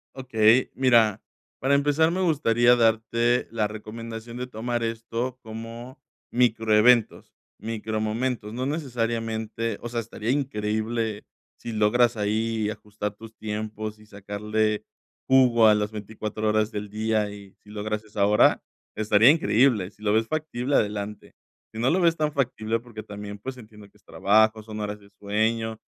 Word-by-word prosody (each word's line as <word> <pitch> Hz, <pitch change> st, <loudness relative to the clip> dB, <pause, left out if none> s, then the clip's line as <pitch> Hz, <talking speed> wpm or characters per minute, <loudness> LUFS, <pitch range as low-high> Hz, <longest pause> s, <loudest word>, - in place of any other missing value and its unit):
Okey, 125 Hz, -2 st, +3 dB
mira, 115 Hz, -6 st, +3 dB, 0.4 s
para 135 Hz, +2 st, +2 dB
empezar, 145 Hz, +3 st, +3 dB
me 185 Hz, +2 st, -1 dB
gustaría 125 Hz, -8 st, +4 dB
darte 115 Hz, +1 st, +2 dB
la 110 Hz, -2 st, 0 dB
recomendación 115 Hz, +2 st, -8 dB
de 125 Hz, 0 st, -4 dB
tomar 120 Hz, 0 st, -3 dB
esto 115 Hz, +2 st, -3 dB
como 115 Hz, +3 st, -9 dB, 0.3 s
microeventos, 115 Hz, -1 st, +3 dB, 0.3 s
micromomentos. 110 Hz, +1 st, -3 dB
No 125 Hz, +2 st, -3 dB
necesariamente 115 Hz, -6 st, -2 dB
o 120 Hz, -, -5 dB
sea, 120 Hz, 0 st, -2 dB
estaría 115 Hz, +1 st, -3 dB
increíble, 110 Hz, -4 st, -2 dB, 0.3 s
si 115 Hz, -, -6 dB
logras 115 Hz, +2 st, +3 dB
ahí 110 Hz, +1 st, 0 dB
ajustar 105 Hz, -1 st, -5 dB
tus 110 Hz, +1 st, -13 dB
tiempos 110 Hz, 0 st, -5 dB
y 110 Hz, -, -17 dB
sacarle 105 Hz, +1 st, -2 dB, 0.4 s
jugo 125 Hz, -4 st, +5 dB
a 105 Hz, -, +6 dB
las 105 Hz, 0 st, -1 dB
24 110 Hz, 0 st, -4 dB
horas 105 Hz, 0 st, +1 dB
del 105 Hz, 0 st, -5 dB
día 110 Hz, 0 st, 0 dB
y 100 Hz, -1 st, -12 dB
si 105 Hz, -, -18 dB
logras 105 Hz, 0 st, -4 dB
esa 105 Hz, -2 st, 0 dB
hora, 105 Hz, +1 st, +4 dB, 0.3 s
estaría 110 Hz, +2 st, +5 dB
increíble. 120 Hz, -, +3 dB
Si 105 Hz, -, -26 dB
lo 105 Hz, -1 st, +1 dB
ves 110 Hz, +1 st, +2 dB
factible, 145 Hz, -3 st, -2 dB
adelante, 105 Hz, 0 st, -2 dB, 0.4 s
si 110 Hz, -, -7 dB
no 120 Hz, +3 st, +2 dB
lo 185 Hz, -, +2 dB
ves 165 Hz, -1 st, +4 dB
tan 150 Hz, -1 st, 0 dB
factible, 115 Hz, -5 st, -1 dB
porque 115 Hz, -2 st, -10 dB
también, 105 Hz, 0 st, -8 dB
pues 130 Hz, +5 st, -7 dB
entiendo 105 Hz, -3 st, -14 dB
que -, -, -26 dB
es -, -, -33 dB
trabajo, 110 Hz, +2 st, +2 dB
son 110 Hz, 0 st, -8 dB
horas 105 Hz, 0 st, -4 dB
de 100 Hz, 0 st, -19 dB
sueño 110 Hz, +2 st, -1 dB
110 Hz, 150 wpm, -25 LUFS, 105-120 Hz, 0.4 s, a